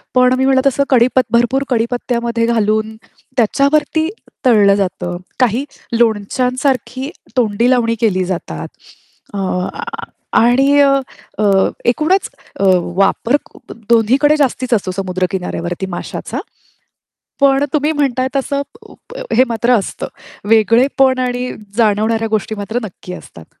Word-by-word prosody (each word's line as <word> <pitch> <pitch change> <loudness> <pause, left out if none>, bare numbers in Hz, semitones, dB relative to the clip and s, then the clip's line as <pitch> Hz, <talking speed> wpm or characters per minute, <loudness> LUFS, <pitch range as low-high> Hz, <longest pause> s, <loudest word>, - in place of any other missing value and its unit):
पण 250 0 +5
मी 265 - +1
म्हणलं 265 -1 +3
तसं 275 +1 +2
कडीप 255 0 +4
भरपूर 240 +3 +2
कडीपत्त्यामध्ये 235 -1 -1
घालून, 220 -1 0 0.4
त्याच्यावरती 295 +7 +2 0.4
तळलं 205 -5 +5
जातं. 180 -2 -2 0.2
काही 250 +2 +2 0.3
लोणच्यांसारखी 250 +4 0 0.3
तोंडी 230 0 +2
लावणी 230 -2 +2
केली 185 -5 +1
जातात. 170 - -5 0.7
आह 185 -2 -2 0.7
आणि 270 +4 +4
अ, 280 -1 +5 0.5
अ, 215 - +1 0.5
एकूणच 315 +10 +1 0.3
अ, - - 0 0.3
वापर 230 +7 +2
क - - -20 0.3
दोन्हीकडे 255 +7 +4
जास्तीच 255 -3 0
असतो 190 -3 -2
समुद्र 185 -1 -1
किनाऱ्यावरती 180 -1 -3
माशाचा. 175 - -5 1.0
पण 275 0 +4
तुम्ही 300 +1 +1
म्हणताय 260 -4 0
तसं 280 +1 -1 0.2
उप - - -16 0.2
हे 255 - +5
मात्र 235 +1 +1
असतं. 195 - -5 0.4
वेगळेपण 255 +4 +3
आणि 250 0 -2 0.3
जाणवणाऱ्या 220 +1 +2
गोष्टी 215 0 -1
मात्र 215 +4 -3
नक्की 180 -2 -8
असतात. 80 - -12
235 Hz, 115 wpm, -16 LUFS, 210-265 Hz, 1.0 s, पण